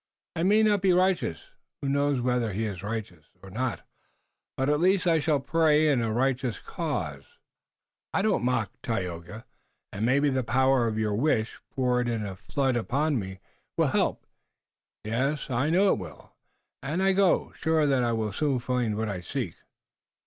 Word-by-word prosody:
I 165 - -2
may 210 +5 +4
not 205 -2 +3
be 190 -2 +4
righteous, 180 - +1 0.4
who 140 - -4
knows 140 -1 +1
whether 120 -3 0
he 110 +4 -1
is 100 -5 -5
righteous 100 -6 -5 0.2
or 95 - -11
not? 120 +2 -3 0.7
but, 135 - 0
at 150 0 +2
least, 185 +2 +3
I 165 -2 +4
shall 150 -1 +1
pray 155 +1 +3
in 135 -5 +2
a 115 -1 -1
righteous 125 0 0
cause." 90 - -5 0.7
"I 195 - 0
don't 210 - +1
mock, 120 -5 0
Tayoga, 90 -1 -4 0.5
and 100 - -3
maybe 140 +4 +3
the 130 -1 0
power 130 +1 +3
of 110 -1 -2
your 110 -1 0
wish, 115 -1 0
poured 125 -2 0
in 115 -3 -2
a 95 -2 -5
flood 130 +8 -1
upon 140 +4 0
me, 95 -2 -7 0.4
will - - +3
help. - - 0 0.8
Yes, 135 +7 -1
I 125 +5 +1
know 190 +4 +4
it - - -3
will, 90 -4 -10 0.5
and 155 +7 -1
I 195 0 +4
go 190 -2 +3
now, - - -23
sure 160 -2 +2
that 135 -3 +2
I 120 - +1
will 110 -3 -1
soon 145 +2 0
find 120 -3 -1
what 110 0 -1
I 95 -3 -4
seek." 90 - -4
125 Hz, 180 wpm, -27 LUFS, 110-150 Hz, 0.8 s, may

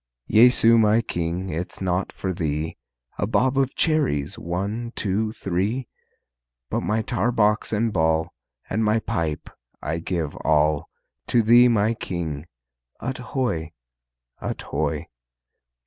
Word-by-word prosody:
Jesu 115 0 +6
my 110 +1 +4
King, 85 0 -3
it's 85 +3 -4
naught 90 0 -1
for 95 -1 -3
Thee, 80 -1 -2 0.4
A - - +1
bob 130 +4 +2
of 135 -1 +1
cherries, 150 - +1
one, 100 +8 -3
two, 105 +2 0
three, 105 +5 -2 0.8
But - - 0
my 110 +1 0
tar 110 +4 0
box 105 -2 +2
and 110 0 0
ball, 80 -1 +1 0.3
And 110 - 0
my 110 +1 +3
pipe, 80 -7 -2 0.3
I 80 +2 -3
give 80 -3 -3
all 75 -1 +2 0.4
To 120 - +3
Thee, 120 +3 +7
my 110 -1 +3
King. 85 -7 -4 0.5
Ut 130 0 -4
hoy! 120 - -2 0.7
Ut - - -3
hoy! - - -2
100 Hz, 130 wpm, -24 LUFS, 80-115 Hz, 0.8 s, Thee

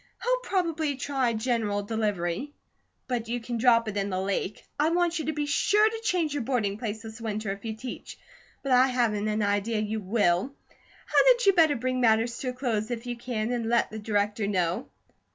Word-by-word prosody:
He'll - - +2
probably 330 -6 0
try 260 -2 0
general 220 -3 0
delivery, 210 +3 -2 0.5
but 240 -3 -2
you 240 +1 -2
can 235 0 -4
drop 230 -1 +4
it 210 - -4
in 200 0 -1
the 185 -1 -1
lake. 195 +1 -2
I 305 +2 +3
want 345 0 +1
you 315 - -3
to 315 - 0
be 300 -1 -2
sure 415 +9 +3
to 445 +1 -3
change 360 -9 0
your 290 - -1
boarding 220 -5 -1
place 220 -1 -4
this 225 +1 -9
winter, 215 -2 -3
if 195 0 -7
you 220 -1 -4
teach; 250 +2 -8 0.5
but 275 - -2
I 255 +1 +6
haven't 230 -5 0
an 215 0 0
idea 205 +2 0
you 215 +1 -1
will. 200 +4 +1 0.5
Hadn't - - +4
you 395 - +6
better 320 -5 +4
bring 255 +1 -1
matters 230 0 +3
to 255 - -2
a - - -4
close 235 -4 -2
if 240 0 -4
you 245 0 -3
can, 235 -2 -3
and 235 -2 -1
let 235 0 +2
the 220 - -6
Director 210 0 0
know? 180 +2 -1
230 Hz, 205 wpm, -27 LUFS, 210-275 Hz, 0.5 s, I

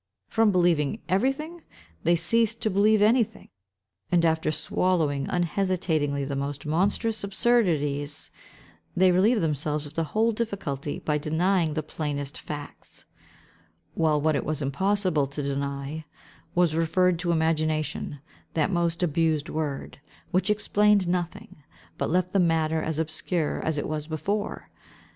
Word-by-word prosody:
From 225 -2 +3
believing 175 0 +2
everything, 270 - -1 0.4
they 170 +1 +3
ceased 225 +6 +1
to 215 - +1
believe 205 +2 +4
anything; 225 0 +2 0.6
and, 170 -1 +4
after 160 -1 +1
swallowing 155 -4 0
unhesitatingly 170 -5 0
the 140 0 -3
most 140 +1 -4
monstrous 200 +8 0
absurdities, 160 -10 0 0.7
they 185 0 +5
relieved 210 +6 +3
themselves 150 -1 -1
of 145 - -10
the 165 - -1
whole 220 +7 +1
difficulty, 195 - -3
by 150 -1 -1
denying 160 +1 +1
the 155 - -1
plainest 145 -2 -4
facts; 145 -1 -9 0.9
while 155 -2 +2
what 155 +1 +2
it - - 0
was 155 0 -2
found 135 - 0
impossible 185 -2 +1
to 145 +2 -5
deny, 140 +2 -3 0.5
was 175 -3 +3
referred 165 +2 +2
to 175 -1 0
imagination—that 155 0 -1
most 170 -1 0
abused 160 -1 +1
word, 145 -3 -4 0.3
which 185 +4 +1
explained 210 -2 +3
nothing, 175 -1 -3 0.4
but - - 0
left 180 +2 +1
the 195 - +2
matter 160 -2 +2
as 155 -1 -2
obscure 160 0 -1
as 160 -1 -1
it - - -2
was 155 0 -3
before. 200 +6 -3
165 Hz, 135 wpm, -26 LUFS, 150-190 Hz, 0.9 s, they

